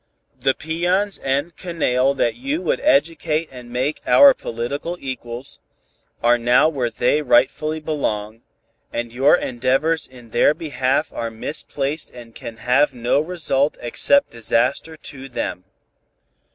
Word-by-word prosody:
The 135 -1 +2
peons 175 +6 -1
and 140 +5 -1
canaille 140 -7 0
that 120 -3 +1
you 135 +7 -3
would 170 - 0
educate 155 +2 +1
and 125 -2 -11
make 130 +5 -2
our 280 -1 +8
political 140 - -4
equals, 125 -1 -6 0.6
are 120 +1 +4
now 120 +5 +4
where 135 -7 -1
they 125 +6 +1
rightfully 140 +4 +2
belong, 115 -8 -3 0.5
and 120 0 -4
your 135 +6 +5
endeavors 135 +4 0
in 120 -3 -16
their 150 - +4
behalf 140 -2 -1
are 115 - -3
misplaced 140 +5 -3
and 120 -2 -13
can 115 -3 -8
have 130 +4 +2
no 120 +3 +1
result 155 -4 0
except 280 - +2
disaster 120 +7 0
to 135 -2 -9
them. 90 -6 -4
135 Hz, 130 wpm, -21 LUFS, 120-155 Hz, 0.6 s, our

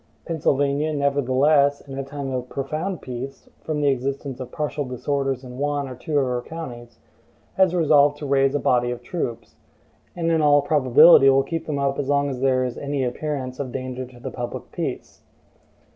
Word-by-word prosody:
Pennsylvania, 145 -1 0
nevertheless, 140 +1 +2
in 135 -1 -10
a 135 - -3
time 140 0 -6
of 125 -1 -4
profound 155 +7 -4
peace, 130 +2 -7 0.2
from 155 -2 -2
the 145 - +3
existence 135 0 -3
of 125 -1 -7
partial 150 -1 -2
disorders 135 +1 -2
in 125 0 -9
one 145 -1 -1
or 130 - -7
two 145 +4 -3
of 140 - +3
her 125 -1 -1
counties, 120 -7 -9 0.6
has 190 -2 +3
resolved 145 -3 +4
to 145 - -7
raise 135 0 +2
a - - +2
body 120 -2 +2
of 120 -1 -5
troops; 125 -10 -5 0.6
and 165 -1 0
in 160 -1 +2
all 145 -1 +5
probability 145 0 +6
will 135 0 +4
keep 165 +2 -4
them 150 -2 -2
up 140 0 0
as 140 -1 -2
long 145 0 +2
as 130 - -5
there 130 -1 +2
is 125 -1 -4
any 140 -1 -2
appearance 130 0 -3
of 135 -3 -4
danger 130 0 -5
to 125 -1 -16
the - - -6
public 120 -1 -6
peace. - - -5
140 Hz, 190 wpm, -23 LUFS, 130-145 Hz, 0.6 s, probability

